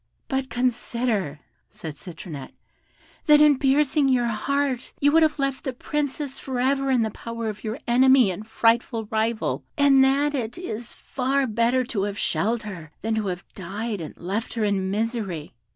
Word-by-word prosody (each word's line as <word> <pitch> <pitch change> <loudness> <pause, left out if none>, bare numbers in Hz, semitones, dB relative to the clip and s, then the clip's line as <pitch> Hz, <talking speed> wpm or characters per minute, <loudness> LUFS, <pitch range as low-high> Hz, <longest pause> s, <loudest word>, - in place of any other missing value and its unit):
"But 265 -1 -2
consider," 235 - -1 0.3
said 185 -8 -7
Citronette, 160 -4 -9 0.7
"that 300 -1 +8
in 295 -3 +6
piercing 280 +1 +3
your 250 -2 +3
heart 255 +3 -1
you 285 +1 +4
would 325 +2 +5
have 310 -1 +3
left 275 -1 -1
the 265 - -3
Princess 285 +1 -3
for 260 -2 -4
ever 270 +2 +1
in 250 -3 +3
the 220 - -1
power 230 +1 -5
of 210 - -7
your 220 +2 -3
enemy 255 -2 +5
and 210 +4 -7
frightful 230 0 +1
rival, 220 0 0
and 275 -2 +6
that 280 +2 +2
it 240 -4 -3
is 240 -9 -6
far 270 +1 -1
better 235 +2 +2
to 235 -5 -3
have 205 0 -4
shelled 225 +4 0
her 180 -7 -8
than 225 +1 0
to 220 -2 -1
have 180 -1 -4
died 205 +2 -4
and 155 - -8
left 200 +8 -3
her 225 - 0
in 195 -2 0
misery." 205 - -2
235 Hz, 170 wpm, -24 LUFS, 210-270 Hz, 0.7 s, that